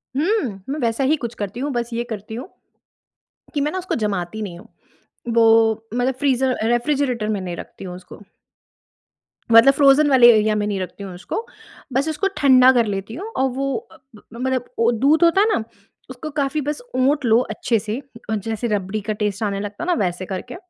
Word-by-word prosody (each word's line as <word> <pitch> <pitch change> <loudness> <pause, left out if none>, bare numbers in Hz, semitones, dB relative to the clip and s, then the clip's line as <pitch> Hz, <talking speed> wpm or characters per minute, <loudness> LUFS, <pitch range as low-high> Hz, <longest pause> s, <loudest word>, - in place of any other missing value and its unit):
हुँ, 290 - 0
मैं 290 +3 -2
वैसा 235 +1 0
ही 285 +4 +3
कुछ 235 -4 -5
करती 205 +3 -5
हूँ। 285 +3 -2
बस 240 -2 -2
ये 235 - -1
करती 220 0 -6
हूँ, 250 +8 -6 1.1
कि 290 - 0
मैं 295 +2 0
ना 375 - -4
उसको 370 0 -3
जमाती 210 -2 -2
नहीं 180 -5 -6
हूँ। - - -15 0.7
वो, 225 -1 +4
मतलब 245 +2 0
फ्रीज़र 265 -2 +1
रेफ्रिजरेटर 240 -2 0
में 210 -2 -1
नहीं 180 -2 -5
रखती - - -10
हूँ, 180 -1 -7
उसको। 180 +3 -13 1.3
मतलब 230 +4 +8
फ्रोज़न 280 +1 +5
वाले 250 -3 +7
एरिया 215 0 +2
में 210 -1 0
नहीं 200 -2 -2
रखती 185 +2 -6
हूँ 190 -2 -7
उसको, 205 - -5 0.5
बस 275 +4 +1
उसको 315 +6 0
ठंडा 260 -3 +6
कर 240 -3 +3
लेती 200 +1 -4
हूँ। 390 +9 -6
और 265 0 +2
वो 270 +1 -2 0.2
अ, - - -16 0.4
मतलब 255 +1 -2
वो 230 +1 +4
दूध 280 +8 +3
होता 340 +3 +5
है 425 - +4
ना? - - -1 0.5
उसको 260 +4 -7
काफ़ी 285 +1 -1
बस 295 - -3
ओट 275 +2 +2
लो 225 0 +5
अच्छे 220 +1 0
से 215 +3 -4 0.3
और 220 - +1
जैसे 225 +1 -2
रबड़ी 205 -1 -2
का 215 +2 -3
टेस्ट 210 0 -2
आने 200 -1 -1
लगता 205 +7 -6
है 345 - -4
ना 355 - +3
वैसे 180 +1 -3
करके। 185 0 -6
235 Hz, 200 wpm, -21 LUFS, 210-275 Hz, 1.3 s, मतलब